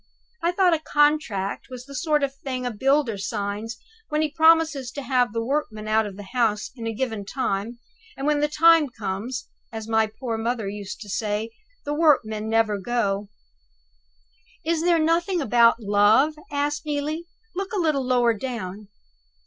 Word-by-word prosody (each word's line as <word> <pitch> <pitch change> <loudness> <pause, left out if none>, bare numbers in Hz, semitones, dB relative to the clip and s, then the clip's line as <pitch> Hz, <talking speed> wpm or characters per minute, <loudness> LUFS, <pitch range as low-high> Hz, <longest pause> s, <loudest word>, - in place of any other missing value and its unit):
I 340 +1 +2
thought 360 -1 +3
a 325 - +1
contract 295 -10 +1
was 250 -1 -8
the 280 - -11
sort 300 +1 +1
of 275 - +1
a - - -28
thing 260 -2 -5
a 245 - -1
builder 265 -1 +1
signs 205 +2 -3 0.3
when 305 0 +1
he 305 - -1
promises 320 -4 +4
to 280 - -5
have 250 -2 +2
the 230 +1 -2
workmen 235 -6 -2
out 215 0 +2
of 195 -2 -9
the 205 - -8
house 225 -4 +1
in 230 -3 -5
a - - -1
given 225 -2 -3
time, 220 0 -2 0.4
and 270 - -4
when 300 0 +2
the 295 - +2
time 325 0 +5
comes 220 +3 -4 0.2
(as 220 -1 -6
my 220 -1 +2
poor 225 +1 -4
mother 230 -2 -1
used 205 0 -6
to 210 - -8
say) 210 +2 -2 0.3
the 290 - -2
workmen 220 -9 +2
never 220 -2 +2
go." 200 -2 -1 1.4
"Is 330 0 +1
there 345 0 +3
nothing 335 +3 +1
about 235 -4 +4
Love?" 210 +8 +4 0.2
asked 290 0 -1
Neelie. 305 +3 -3 0.3
"Look 390 +1 -3
a - - -3
little 305 -5 +1
lower 245 -2 +3
down." 215 -4 -6
245 Hz, 175 wpm, -24 LUFS, 215-295 Hz, 1.4 s, time